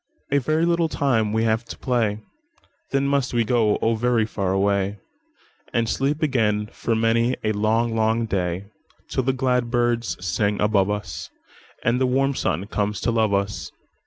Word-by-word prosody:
"A 140 - +4
very 155 +5 +1
little 170 -1 +2
time 115 -9 +1
we 110 +1 +1
have 110 +1 +1
to - - -8
play, 110 -4 0 0.7
Then 135 0 +1
must 140 -3 0
we 120 - +3
go, 110 -2 +2
oh, 115 - +3
very 115 0 +1
far 100 -4 -2
away, 100 +1 +1 0.8
And 115 -1 +2
sleep 145 +6 0
again 105 -7 +1
for 115 - -1
many 115 +2 +2
a 110 - +1
long, 110 +2 +1
long 110 +1 +1
day, 95 -1 -2 0.4
Till - - 0
the 130 +1 +1
glad 125 -2 0
birds 120 -1 0
sing 100 +4 0
above 105 -2 +2
us, 105 -7 -4 0.5
And 120 +2 +1
the 130 - +3
warm 135 +2 +2
sun 95 - -1
comes 105 0 -2
to - - +1
love 110 -2 +2
us. 100 +1 -2
115 Hz, 170 wpm, -23 LUFS, 105-125 Hz, 0.8 s, A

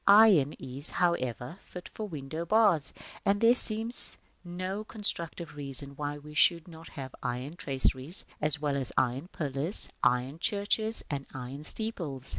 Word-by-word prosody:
Iron 200 -9 +6
is, 135 +3 -4
however, 130 - -2
fit 180 -1 -11
for 215 - -7
window 155 -1 -6
bars, 190 -6 +2 0.3
and 200 +1 +1
there 230 +2 +5
seems 230 -1 +6 0.3
no 185 +3 -5
constructive 170 -7 -3
reason 140 -1 -2
why 145 0 -5
we 150 +1 -13
should 170 +2 +3
not 165 -1 -13
have 130 -3 -9
iron 125 +5 -5
traceries, 135 +2 -1 0.2
as 150 -1 0
well 145 -2 -2
as 135 -3 -3
iron 130 +6 0
pillars, 150 +2 +3
iron 125 +5 0
churches, 215 +3 +1
and 140 -1 -5
iron 130 +3 -8
steeples. 165 - -4
155 Hz, 145 wpm, -28 LUFS, 135-195 Hz, 0.3 s, Iron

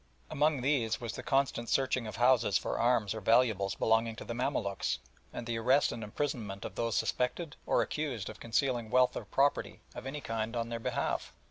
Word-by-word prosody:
Among 150 -2 +2
these 125 -6 +1
was 115 -3 -4
the - - -5
constant 135 -4 0
searching 130 -3 +1
of 110 - -6
houses 120 -4 +4
for - - -3
arms 115 -4 +2
or 110 - -6
valuables 110 -3 +3
belonging 115 0 +2
to - - -8
the 115 - -4
Mamaluks, 115 -6 -1 0.3
and 120 - -6
the 115 -1 -2
arrest 130 +5 +3
and 115 -1 -5
imprisonment 105 -4 -3
of - - -5
those 115 -2 -1
suspected 145 +5 -1
or - - +3
accused 135 -10 -3
of 110 - -8
concealing 120 0 0
wealth 125 +2 +4
or 110 - -4
property 140 +7 +1
of 125 - -7
any 145 +2 -4
kind 115 -2 -3
on 115 0 -2
their 115 0 -3
behalf. - - -2
120 Hz, 195 wpm, -32 LUFS, 110-130 Hz, 0.3 s, houses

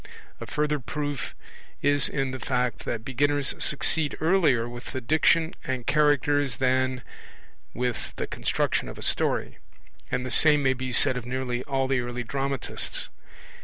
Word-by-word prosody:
A - - -7
further 150 0 0
proof 145 +1 -4 0.5
is 145 0 +3
in 135 -2 -1
the 130 - -5
fact 125 -2 -1
that 115 -1 -4
beginners 145 +2 +1
succeed 150 +1 +2
earlier 155 -9 +3
with 120 +3 -9
the 130 - -2
Diction 160 +5 +2
and 130 -2 -3
Characters 145 -3 +2
than 130 0 +1 0.7
with 125 -1 -3
the - - -3
construction - - -1
of - - -9
a - - -7
story; - - -1 0.5
and 125 0 -2
the 130 - -3
same 150 +3 +5
may 130 -1 +3
be 130 0 -5
said 125 +1 +5
of 125 - -6
nearly 125 -1 -3
all 135 -1 0
the 135 -1 +1
early 120 0 -4
dramatists. 135 +1 -1
130 Hz, 155 wpm, -26 LUFS, 125-145 Hz, 0.7 s, same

